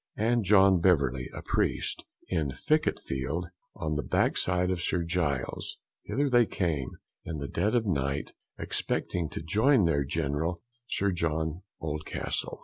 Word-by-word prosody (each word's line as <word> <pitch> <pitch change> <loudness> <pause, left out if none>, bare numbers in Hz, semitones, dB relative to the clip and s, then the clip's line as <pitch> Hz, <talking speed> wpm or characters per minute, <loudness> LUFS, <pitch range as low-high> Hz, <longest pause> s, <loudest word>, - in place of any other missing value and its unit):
and 115 +2 +2
John 95 -1 +6
Beverly, 70 -8 +2
a - - -8
priest, - - -1 0.2
in 80 -5 0
Ficket 155 - +1
field, 70 +7 -3 0.3
on 80 -4 -2
the 75 - 0
backside 90 +4 +1
of 90 -2 -1
St. 85 0 0
Giles's; 85 -7 -1 0.2
hither 145 +1 0
they 120 -4 +4
came 75 -9 -2 0.3
in 80 - -4
the 70 -1 -4
dead 105 - 0
of 115 -2 +2
night, 70 -6 -1 0.3
expecting 85 -4 -1
to - - -6
join 110 - +4
their 70 -4 +2
General, 80 +4 -1 0.3
Sir 100 -4 +1
John 80 -1 -1 0.2
Oldcastle. 75 -1 -3
85 Hz, 145 wpm, -29 LUFS, 75-95 Hz, 0.3 s, John